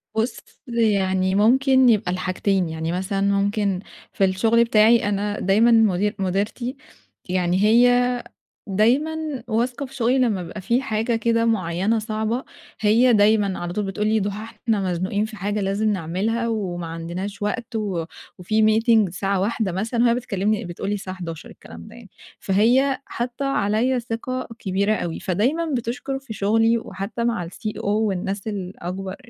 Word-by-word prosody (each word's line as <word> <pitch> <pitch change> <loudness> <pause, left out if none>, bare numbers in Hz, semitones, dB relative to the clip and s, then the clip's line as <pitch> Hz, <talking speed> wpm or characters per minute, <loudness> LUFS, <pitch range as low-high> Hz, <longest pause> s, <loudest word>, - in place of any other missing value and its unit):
بُص، 225 +3 -1 0.3
يعني 195 -5 +1
ممكن 260 +4 +4
يبقى 205 -5 +2
الحاجتين، 185 0 0
يعني 160 +1 -3
مثلًا 190 +2 -2
ممكن 200 -1 +1 0.3
في 195 - +2
الشغل 225 +5 +3
بتاعي 220 -1 +4
أنا 205 +1 -2
دايمًا 215 +5 +4
مدير 210 -2 +3
مديرتي، 205 +7 -2 0.5
يعني 180 0 +1
هي 245 +2 +4 0.4
دايمًا 270 +7 0
واثقة 245 +4 -1
في 270 +1 -13
شُغلي 250 +1 +2
لما 215 -8 +1
بيبقى 175 +5 -8
في 240 +7 +1
حاجة 225 -1 -1
كده 230 0 +1
معينة 200 +1 +1
صعبة، 220 +3 -2 0.4
هي 230 +4 +4
دايمًا 205 -2 +3
على 175 0 -4
طول 210 0 -2
بتقول 210 +2 -2
لي: 220 0 +2
"ضُحى، 205 +1 -3
إحنا 215 -2 -1
مزنوقين 185 +4 -1
في 220 0 -9
حاجة 205 +2 -2
لازم 200 +3 0
نعملها 205 +5 -1
وما 180 -7 -3
عندناش 175 +5 -6
وقت 230 +3 -3
و 195 -7 -2 0.3
وفي 215 +5 0
meeting 220 -1 +4
الساعة 195 +2 -1
13:00" 210 -2 -1
مثلًا، 225 +6 -1
وهي 235 -1 +4
بتكلِّمني 215 -3 -1
بتقول 175 +3 -5
لي 205 - 0
الساعة 190 -1 -6
11:00 165 -3 -7
الكلام 85 0 -12
ده - - -13
يعني، - - -14 0.3
فهي 250 +7 +2
حاطَّة 245 +3 -4
عليَّ 245 +1 +1
ثِقة 250 +2 -4
كبيرة 200 +2 0
أوي، 170 -4 -4
فدايمًا 275 - 0
بتشكُر 250 +3 -4
في 270 -5 -9
شُغلي 225 +3 +2
وحتى 205 +2 -5
مع 230 -8 -1
الCEO 215 +5 -6
والناس 200 -1 -1
الأكبر 190 -1 -5
210 Hz, 150 wpm, -22 LUFS, 190-235 Hz, 0.5 s, ممكن